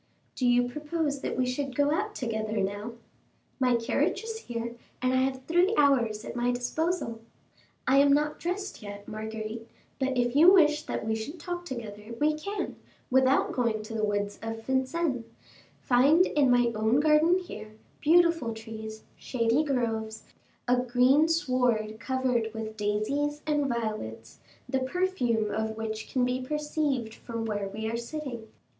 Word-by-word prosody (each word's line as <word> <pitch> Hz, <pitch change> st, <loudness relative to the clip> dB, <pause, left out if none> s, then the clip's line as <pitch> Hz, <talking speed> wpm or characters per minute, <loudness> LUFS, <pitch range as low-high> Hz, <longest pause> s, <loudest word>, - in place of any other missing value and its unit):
"Do 250 Hz, -, 0 dB
you 245 Hz, 0 st, +4 dB
propose 295 Hz, +1 st, -2 dB
that -, -, -3 dB
we 255 Hz, -, +2 dB
should 255 Hz, +1 st, -3 dB
go 285 Hz, +1 st, +3 dB
out 420 Hz, +5 st, -2 dB
together 220 Hz, -3 st, -2 dB
now?" 205 Hz, +3 st, -2 dB, 0.7 s
"My 250 Hz, -2 st, +3 dB
carriage 235 Hz, -, 0 dB
is 450 Hz, 0 st, -5 dB
here, 235 Hz, -, -5 dB, 0.3 s
and 255 Hz, 0 st, +1 dB
I -, -, +3 dB
have 260 Hz, 0 st, 0 dB
three 350 Hz, +8 st, +2 dB
hours 235 Hz, -7 st, +3 dB
at -, -, -6 dB
my 245 Hz, 0 st, +1 dB
disposal." 245 Hz, 0 st, -2 dB, 0.7 s
"I 265 Hz, -, +5 dB
am 280 Hz, 0 st, +6 dB
not 300 Hz, +1 st, +2 dB
dressed 380 Hz, +1 st, -4 dB
yet, 205 Hz, -1 st, -9 dB
Marguerite; 220 Hz, +1 st, -6 dB, 0.3 s
but 265 Hz, -1 st, 0 dB
if 245 Hz, +1 st, +1 dB
you 330 Hz, +5 st, +8 dB
wish 300 Hz, -5 st, +5 dB
that -, -, -3 dB
we 220 Hz, -, 0 dB
should 255 Hz, +10 st, -5 dB
talk 350 Hz, +2 st, -5 dB
together, 225 Hz, -5 st, -7 dB
we 305 Hz, +1 st, +3 dB
can, 400 Hz, +7 st, -4 dB, 0.3 s
without 265 Hz, +1 st, +4 dB
going 230 Hz, -4 st, 0 dB
to 215 Hz, -, -8 dB
the 220 Hz, -1 st, -2 dB
woods 205 Hz, -1 st, -1 dB
of 225 Hz, 0 st, -5 dB
Vincennes, 265 Hz, +1 st, 0 dB, 0.6 s
find 280 Hz, +8 st, +5 dB
in 285 Hz, -7 st, +2 dB
my 245 Hz, -1 st, +4 dB
own 220 Hz, +4 st, +2 dB
garden 310 Hz, +4 st, +4 dB
here, 215 Hz, -, -8 dB, 0.2 s
beautiful 330 Hz, -7 st, +3 dB
trees, 220 Hz, -1 st, -8 dB
shady 235 Hz, +3 st, +1 dB
groves, 225 Hz, -6 st, -2 dB, 0.4 s
a 250 Hz, +1 st, +4 dB
green 250 Hz, +5 st, +4 dB
sward 250 Hz, -9 st, +1 dB
covered 250 Hz, -3 st, 0 dB
with 220 Hz, -1 st, -5 dB
daisies 220 Hz, +9 st, -1 dB
and 295 Hz, -2 st, +1 dB
violets, 215 Hz, -, -4 dB, 0.3 s
the 265 Hz, +1 st, 0 dB
perfume 260 Hz, -, 0 dB
of 220 Hz, 0 st, -2 dB
which 220 Hz, -1 st, -5 dB
can 255 Hz, -2 st, +2 dB
be 250 Hz, +1 st, -1 dB
perceived 295 Hz, -4 st, -1 dB
from 230 Hz, -1 st, -5 dB
where 205 Hz, -2 st, -2 dB
we 215 Hz, +3 st, -5 dB
are 230 Hz, +1 st, -1 dB
sitting." 240 Hz, -2 st, -6 dB
250 Hz, 160 wpm, -28 LUFS, 220-295 Hz, 0.7 s, you